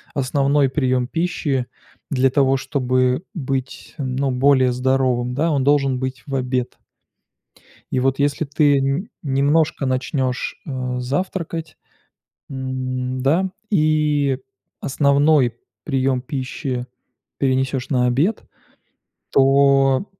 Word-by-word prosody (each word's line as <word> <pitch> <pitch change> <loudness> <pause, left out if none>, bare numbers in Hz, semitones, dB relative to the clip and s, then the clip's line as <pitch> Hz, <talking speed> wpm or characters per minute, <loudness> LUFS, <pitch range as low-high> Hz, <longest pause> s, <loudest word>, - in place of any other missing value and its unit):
основной 140 +1 +2
прием 130 -2 0
пищи 150 -5 -1 0.5
для 135 -1 +3
того, 135 0 +2
чтобы 130 +1 0
быть 135 -4 -4
ну 135 -1 -1
более 130 0 +3
здоровым, 125 -1 +1
да, 160 +4 +1
он 140 -3 +1
должен 135 -2 +2
быть 130 0 -4
в 140 - -3
обед. 125 -1 -2 1.1
И 130 - +1
вот 135 +1 +1
если 145 +2 +1
ты 145 -1 +3
н 140 +8 -1
немножко 145 +1 +1
начнёшь, 130 0 -1
а, 125 -2 -3
завтракать, 165 +3 -3 0.7
м, 130 -1 -3
да? 175 +7 +2 0.2
И 150 -6 +2 0.4
основной 140 -2 +3 0.3
приём 135 -3 0
пищи 130 -1 -4 0.5
перенесешь 130 -1 0
на 125 -3 +2
обед, 150 - +1 0.9
то 135 +3 +4
135 Hz, 105 wpm, -21 LUFS, 130-145 Hz, 1.1 s, то